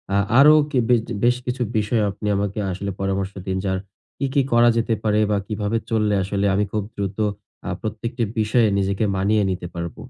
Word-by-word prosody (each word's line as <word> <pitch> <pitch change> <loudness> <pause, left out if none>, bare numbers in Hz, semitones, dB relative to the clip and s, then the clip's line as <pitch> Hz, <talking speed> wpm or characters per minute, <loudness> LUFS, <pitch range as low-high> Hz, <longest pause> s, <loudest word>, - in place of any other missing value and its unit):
আ - - +4 0.2
আরও 150 +2 +8 0.2
কি 135 - 0
বেজ 120 -2 +4 0.2
বেশ 120 +1 +4
কিছু 125 0 -3 0.2
বিষয়ে 110 +1 +1
আপনি 105 +2 -6
আমাকে 100 +1 -2
আসলে 100 +2 -4
পরামর্শ 95 0 -1 0.2
দিন 95 0 -1
যার 95 -1 0 0.4
কি, 140 - -1
কি 145 - +4
করা 120 0 +5
যেতে 115 0 +1
পারে 105 -1 +2
বা 105 - +2
কিভাবে 105 +1 -1
চললে 105 -2 +1
আসলে 100 +1 -1
আমি 100 +2 +2
খুব 105 -1 -1
দ্রুত 100 -1 -4 0.5
আ - - -2
প্রত্যেকটি 115 +3 -3 0.2
বিষয়ে 110 +2 +3
নিজেকে 100 +2 0
মানিয়ে 105 +2 +2
নিতে 90 -1 -3
পারব। 85 -1 -5
105 Hz, 190 wpm, -22 LUFS, 100-115 Hz, 0.5 s, আরও